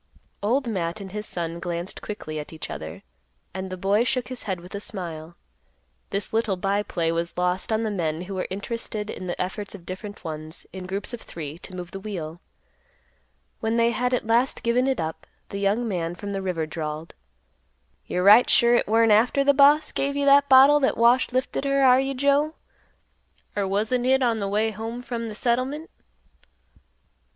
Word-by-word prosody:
Old 245 +6 +1
Matt 180 -4 -2
and 195 -2 -8
his 210 +1 -4
son 170 -1 -4
glanced 175 +1 -4
quickly 155 -7 -5
at 150 - -8
each 160 -1 -7
other, 80 0 -7 0.5
and 190 0 -5
the 185 - -5
boy 200 +5 +2
shook 250 0 -1
his 255 -1 -5
head 185 -2 -1
with 180 +1 -12
a 200 - -3
smile. 170 -5 -5 0.7
This 200 +2 -3
little 220 -3 +1
by 195 +2 0
play 170 -5 -1
was 170 +1 -3
lost 180 +3 0
on 220 +1 +1
the 220 - -1
men 165 -4 -2
who 195 +2 -7
were 185 - -2
interested 210 +1 -4
in 185 - -7
the 175 - -4
efforts 200 +3 -4
of 175 -4 -13
different 200 +3 -7
ones, 155 0 -7
in 185 -1 -7
groups 195 +4 -4
of 235 - -6
three, 155 -1 -7
to 185 - -9
move 180 -1 -7
the 195 - -6
wheel. 175 -5 -6 1.2
When 225 0 0
they 235 0 +3
had 250 +2 0
at 250 -2 0
last 235 +4 +2
given 245 +2 +2
it 265 -2 0
up, 160 0 -4 0.2
the 200 - -4
young 205 +4 +1
man 175 -4 -2
from 200 +2 -6
the 195 - -2
river 180 -4 -1
drawled, 155 0 -5 0.9
"You're 180 - -1
right 210 +5 +8
sure 235 0 +5
hit - - 0
weren't 225 +1 +4
after 240 +6 +4
th' 285 0 +5
boss 290 +2 +5
give 280 +1 -1
you 285 0 0
that 280 0 +6
bottle 275 +3 +8
that 270 - +1
Wash 240 +3 +4
lifted 255 +2 -1
her, 275 0 +2
are 255 -1 +7
you 270 0 -1
Joe? 285 +4 +2 1.0
Or 200 -2 0
wasn't 220 +6 0
hit 265 +1 +3
on 230 -2 +2
th' 200 - -1
way 215 +2 +1
home 225 +3 -6
from 235 -3 -4
th' 210 - -7
settlement?" 255 +7 -1
210 Hz, 195 wpm, -25 LUFS, 180-245 Hz, 1.2 s, right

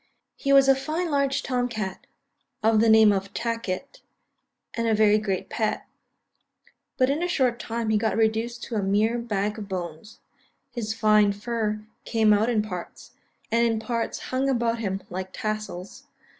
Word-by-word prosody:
He 275 - -1
was 275 -1 +7
a 270 - +7
fine 315 +5 -2
large 280 -1 +1
Tom 250 -1 -1
cat, 210 -5 -5 0.6
of 220 0 +4
the 225 +1 +4
name 220 -1 +7
of 195 0 -2
Tacket, 230 0 -3 0.7
and 230 0 -1
a 220 - +3
very 210 0 +4
great 195 -3 -2
pet; 220 -2 -2 1.1
but 260 0 +3
in 295 +4 -1
a 355 - 0
short 255 -8 +1
time 230 -1 -2
he 215 - +3
got 220 0 0
reduced 225 +2 0
to - - -7
a 210 - +1
mere 210 +5 +1
bag 210 -2 -2
of 205 -1 -8
bones; 180 +2 -6 0.5
his 225 -3 -3
fine 215 -2 +4
fur 215 0 -2 0.2
came 220 -2 +3
out 215 +3 +2
in 220 -3 +1
parts, 180 -5 -8 0.4
and 230 +1 +3
in 225 -1 0
parts 230 +1 -2 0.2
hung 265 +1 +1
about 235 -3 0
him 195 -3 -3
like 185 +1 -4
tassels. 215 -4 -5
220 Hz, 170 wpm, -25 LUFS, 210-240 Hz, 1.1 s, was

